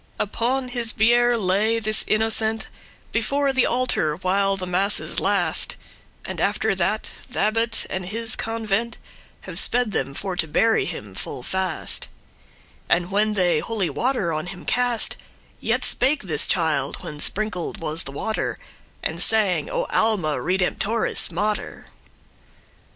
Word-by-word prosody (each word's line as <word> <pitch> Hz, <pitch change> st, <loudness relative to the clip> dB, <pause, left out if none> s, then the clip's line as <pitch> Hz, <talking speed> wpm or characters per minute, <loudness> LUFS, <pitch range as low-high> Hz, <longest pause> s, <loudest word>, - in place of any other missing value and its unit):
Upon 250 Hz, +5 st, -1 dB
his 240 Hz, -2 st, -2 dB
biere 240 Hz, +2 st, +4 dB
lay 210 Hz, +3 st, +1 dB
this 215 Hz, -1 st, +2 dB
innocent 220 Hz, 0 st, +2 dB, 0.5 s
Before 275 Hz, +4 st, +1 dB
the 260 Hz, -2 st, +3 dB
altar 240 Hz, -11 st, +1 dB
while 195 Hz, +3 st, +1 dB
the 185 Hz, -, -3 dB
masses 185 Hz, +3 st, +1 dB
last';* -, -, +1 dB
*lasted -, -, -27 dB, 0.5 s
And, -, -, -4 dB
after -, -, +1 dB
that, -, -, 0 dB, 0.3 s
th' -, -, -9 dB
abbot 225 Hz, +1 st, +1 dB
with 185 Hz, -1 st, -3 dB
his 225 Hz, +5 st, +1 dB
convent 225 Hz, 0 st, -2 dB, 0.4 s
Have -, -, +1 dB
sped 245 Hz, -3 st, +2 dB
them 140 Hz, -6 st, -2 dB
for 190 Hz, +1 st, -3 dB
to 160 Hz, -, +1 dB
bury 225 Hz, +9 st, +2 dB
him 105 Hz, -, -7 dB
full 125 Hz, -, -6 dB
fast; 190 Hz, +1 st, -1 dB, 0.8 s
And 175 Hz, +1 st, +2 dB
when 210 Hz, +2 st, +1 dB
they 175 Hz, -5 st, +2 dB
holy 200 Hz, -6 st, -2 dB
water 225 Hz, -, 0 dB
on 155 Hz, +3 st, -3 dB
him 180 Hz, 0 st, -8 dB
cast, 245 Hz, -1 st, +2 dB, 0.4 s
Yet -, -, 0 dB
spake 270 Hz, +2 st, +2 dB
this 155 Hz, -6 st, +3 dB
child, 155 Hz, -6 st, 0 dB
when 150 Hz, -, -7 dB
sprinkled 205 Hz, -1 st, -2 dB
was 160 Hz, 0 st, -2 dB
the 135 Hz, -, -7 dB
water, 220 Hz, +10 st, -2 dB, 0.5 s
And -, -, -2 dB
sang, 195 Hz, -8 st, +3 dB
O -, -, -1 dB
Alma 195 Hz, -9 st, +1 dB
redemptoris 190 Hz, +4 st, +1 dB
mater! 210 Hz, +5 st, -3 dB
210 Hz, 140 wpm, -23 LUFS, 180-230 Hz, 0.8 s, biere